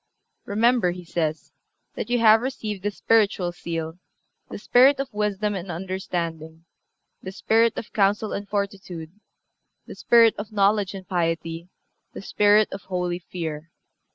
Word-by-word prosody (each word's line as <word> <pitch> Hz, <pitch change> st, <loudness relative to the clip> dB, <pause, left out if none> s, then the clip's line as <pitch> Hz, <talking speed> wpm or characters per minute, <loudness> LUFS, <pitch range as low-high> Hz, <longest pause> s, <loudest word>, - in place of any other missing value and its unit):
"Remember," 230 Hz, -1 st, +2 dB
he 180 Hz, 0 st, -6 dB
says, 160 Hz, -2 st, -3 dB, 0.4 s
"that -, -, -5 dB
you 245 Hz, -, +2 dB
have 225 Hz, -1 st, +6 dB
received 215 Hz, -6 st, -4 dB
the 205 Hz, -, -1 dB
spiritual 205 Hz, -4 st, +1 dB
seal, 165 Hz, -1 st, -5 dB, 0.5 s
the -, -, -6 dB
spirit 270 Hz, +3 st, +4 dB
of 275 Hz, -4 st, -4 dB
wisdom 210 Hz, 0 st, -1 dB
and 190 Hz, -1 st, -6 dB
understanding, 170 Hz, -3 st, -5 dB, 0.6 s
the 190 Hz, -, -7 dB
spirit 225 Hz, +3 st, +2 dB
of -, -, -7 dB
counsel 205 Hz, +1 st, +1 dB
and 200 Hz, 0 st, -5 dB
fortitude, 195 Hz, -5 st, -4 dB, 0.7 s
the -, -, -9 dB
spirit 230 Hz, -2 st, +4 dB
of 205 Hz, +1 st, -7 dB
knowledge 200 Hz, -1 st, +1 dB
and 190 Hz, -2 st, -9 dB
piety, 165 Hz, -1 st, -2 dB, 0.4 s
the -, -, -8 dB
spirit 210 Hz, +1 st, +3 dB
of 195 Hz, -, -6 dB
holy 180 Hz, -2 st, -2 dB
fear. 165 Hz, -3 st, -6 dB
195 Hz, 140 wpm, -24 LUFS, 175-215 Hz, 0.7 s, have